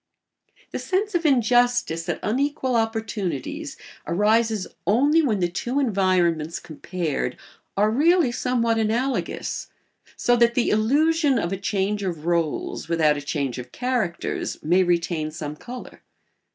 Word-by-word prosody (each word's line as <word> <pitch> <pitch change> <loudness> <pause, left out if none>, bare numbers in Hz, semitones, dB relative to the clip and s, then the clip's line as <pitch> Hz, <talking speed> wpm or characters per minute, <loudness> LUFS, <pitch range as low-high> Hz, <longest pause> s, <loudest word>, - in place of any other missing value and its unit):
The - - -3
sense 405 +3 -1
of 340 -2 +2
injustice 245 - +2
at - - -1
unequal 260 +2 0
opportunities 225 - -2 0.3
arises 215 +3 +2 0.2
only 285 +10 +4
when 220 -10 0
the 175 - +3
two 240 +10 -2
environments 185 - +1
compared 155 -5 -4 0.4
are 210 +2 +3
really 315 +2 +4
somewhat 235 -2 0
analogous, 235 +5 -1 0.5
so 245 - +2
that 235 0 +4
the 245 - +2
illusion 285 +6 +3
of 175 -5 -1
a - - 0
change 200 +1 -1
of 185 -3 -2
rôles 170 -2 -1
without 155 -3 +3
a 145 - -4
change 140 -3 -2
of 125 0 -9
characters 245 -9 -2
may 175 +5 +4
retain 170 -3 0
some 155 -1 -6
colour. 250 +10 -10
220 Hz, 130 wpm, -24 LUFS, 170-255 Hz, 0.5 s, only